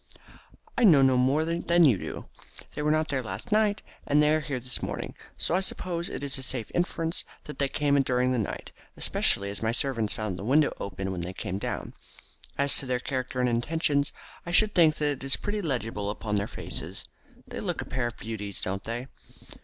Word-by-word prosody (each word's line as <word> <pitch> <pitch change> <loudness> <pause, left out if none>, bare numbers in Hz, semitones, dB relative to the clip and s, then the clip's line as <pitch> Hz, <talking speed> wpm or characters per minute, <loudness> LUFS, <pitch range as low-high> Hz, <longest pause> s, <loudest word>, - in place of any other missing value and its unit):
"I - - +3
know 155 -11 +8
no 130 -1 +5
more 135 +5 +3
than 170 +1 +3
you 135 -8 +6
do. - - -6 0.5
They - - -4
were 150 - +1
not 155 0 +2
there 135 -2 0
last 125 - -7
night, 210 -1 +3 0.2
and 150 +1 +4
they 150 +1 +4
are 155 - +3
here 145 -4 -3
this 125 +1 -4
morning, - - -4 0.2
so - - 0
I 180 - +4
suppose 175 -2 -3
it - - -5
is 140 -1 0
a - - -6
safe 125 -4 -2
inference 165 -1 0 0.2
that 150 - -9
they 140 - +3
came 145 -1 +1
in 140 - +5
during 125 -1 +1
the 125 - +1
night, 105 - -4 0.3
especially 100 0 +1
as 100 - -4
my 110 0 +1
servants 115 -4 0
found 105 -5 -3
the - - -5
window 145 +6 +3
open 95 0 -4
when 90 -2 -3
they 90 +2 -4
came 95 +1 -4
down. - - -4 0.6
As 140 0 +5
to 135 - -7
their 125 -1 0
character 130 -1 -3
and 125 - +3
intentions, 140 +4 +1 0.3
I - - -7
should 210 +4 +5
think 160 -4 +5
that 145 -3 -1
is 135 - +3
pretty 210 0 -3
legible 115 - -2
upon 105 0 -2
their 100 +1 0
faces. - - -6 0.4
They - - -6
look - - -2
a - - -13
pair 125 -2 -1
of 120 - -7
beauties, 105 -3 -2
don't 95 +1 -2
they?" 120 +2 -4
135 Hz, 215 wpm, -28 LUFS, 115-155 Hz, 0.6 s, know